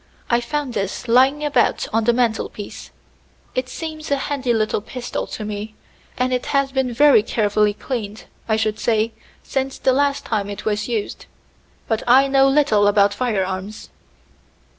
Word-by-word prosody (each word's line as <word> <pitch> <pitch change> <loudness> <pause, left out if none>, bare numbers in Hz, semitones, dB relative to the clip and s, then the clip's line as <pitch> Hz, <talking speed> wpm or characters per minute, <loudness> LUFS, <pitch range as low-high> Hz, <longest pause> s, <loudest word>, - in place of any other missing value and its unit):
"I 235 0 +3
found 275 +1 -3
this 200 +3 -3
lying 265 +5 +4
about 270 -5 +1
on 225 0 +1
the 240 - +5
mantel 235 -2 0
piece. 205 - -9 0.6
It 255 0 -2
seems 310 +2 -6
a 285 - +3
handy 270 -2 -2
little 215 -2 0
pistol 245 +3 -5
to 215 - -6
me, 210 +1 -6 0.4
and 255 +1 0
it 250 - -2
has 275 -1 +1
been 265 -2 0
very 280 -1 +6
carefully 210 -1 +1
cleaned, 215 -5 -5 0.2
I 220 - +3
should 215 -1 -1
say, 225 0 +1 0.3
since 270 0 -2
the 260 - +2
last 280 +1 +1
time 205 -3 -2
it 205 0 -7
was 210 -1 -1
used. 225 -4 -4 0.6
But 225 -1 0
I 265 +3 +6
know 270 0 +4
little 270 -8 +3
about 205 0 +4
firearms." 200 -3 -3
235 Hz, 160 wpm, -21 LUFS, 210-270 Hz, 0.6 s, very